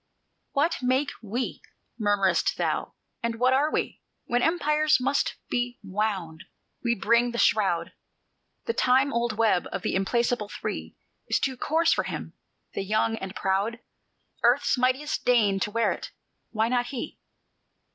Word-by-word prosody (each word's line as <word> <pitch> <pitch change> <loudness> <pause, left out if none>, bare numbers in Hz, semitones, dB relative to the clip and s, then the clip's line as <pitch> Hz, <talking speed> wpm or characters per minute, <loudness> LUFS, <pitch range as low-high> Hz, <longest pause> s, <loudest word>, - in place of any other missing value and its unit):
"What 315 +4 +1
make 260 +3 +1
we, 235 +4 -3 0.4
murmur'st 200 -4 +2
thou? - - -1 0.3
and 235 0 -1
what 250 +3 +3
are 290 +4 +2
we? - - -2 0.2
When 245 +1 +1
empires 305 -1 +3
must 275 +3 0
be 245 0 -2
wound, 190 -4 -2 0.4
we 235 -1 +2
bring 235 +3 +3
the 235 - -5
shroud, 195 -7 +2 0.7
The 465 - 0
time 265 - +3
old 235 -1 0
web 215 -6 +2
of - - -4
the - - -1
implacable 235 +2 0
Three: - - -5 0.3
Is - - +2
it - - -6
too 265 -1 0
coarse 325 +6 +2
for - - 0
him, - - -5 0.4
the - - -2
young 215 +3 +1
and 190 -2 -6
proud? 195 +4 0 0.6
Earth's 245 +6 +3
mightiest 260 +4 0
deigned 210 -6 +3
to 210 - -1
wear 230 +1 +2
it, - - -5 0.4
why 220 0 +1
not 245 0 +1
he?" 255 -3 -6
235 Hz, 150 wpm, -26 LUFS, 210-260 Hz, 0.7 s, what